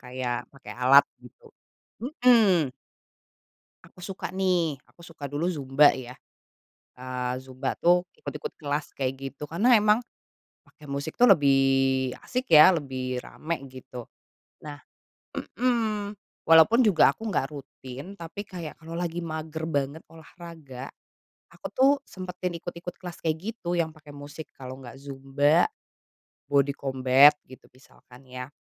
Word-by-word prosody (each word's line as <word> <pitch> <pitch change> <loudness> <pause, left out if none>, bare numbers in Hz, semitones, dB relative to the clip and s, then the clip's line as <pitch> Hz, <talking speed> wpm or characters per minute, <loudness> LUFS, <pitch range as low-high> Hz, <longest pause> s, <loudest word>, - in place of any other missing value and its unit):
Kayak 125 -1 -4
pakai 135 0 -11
alat 140 +3 +7 0.2
gitu, 485 - -17 0.6
hmm. 230 - +3 1.1
Aku 180 - -13
suka, 195 -1 -5
nih, 180 -5 0
aku - - -26
suka 165 -3 -11
dulu 145 +5 -2
zumba, 145 -3 +4
ya. 125 -1 -8 0.8
Eee, 125 0 -4
zumba, 130 0 -4
tuh, 175 +1 +3
ikut-ikut 460 0 -7
kelas 145 0 -4
kayak 130 -1 -1
gitu 135 +1 -8
karena 220 +10 +4
emang, 215 0 +5 0.6
pakai 150 - -18
musik, 140 +2 -5
tuh, 245 - +7
lebih 135 - +3
asik, 255 -8 0
ya, 155 +4 +10
lebih 130 -6 -3
rame 160 +6 -5
gitu. 130 -2 -10 0.5
Nah, 145 -1 -8 0.8
hmm, 215 -4 0 0.3
walaupun 165 +9 +7
juga 185 - +5
aku 225 - -7
nggak 140 -7 0
rutin 135 +5 -10
tapi 170 +3 -7
kayak 170 -5 -7
kalau 165 +1 -8
lagi 175 -1 -3
mager 160 -1 -5
banget 145 0 -2
olahraga, 160 -5 -11 0.7
aku, - - -18
tuh, 265 +2 +4
sempetin 180 -2 -5
ikut-ikut 175 +1 -8
kelas 175 -2 -9
kayak 160 -1 0 0.2
gitu 175 -6 -3
yang 160 -2 -1
pakai 150 -2 -15
musik, 145 +2 -9
kalau 130 0 -9
enggak 130 +1 -11
zumba, 140 +3 +1 0.8
body 140 0 +2
combat 135 +1 +5
gitu 130 - -16
misalkan, 130 0 -20
ya. 125 0 -7
150 Hz, 130 wpm, -26 LUFS, 135-175 Hz, 1.1 s, ya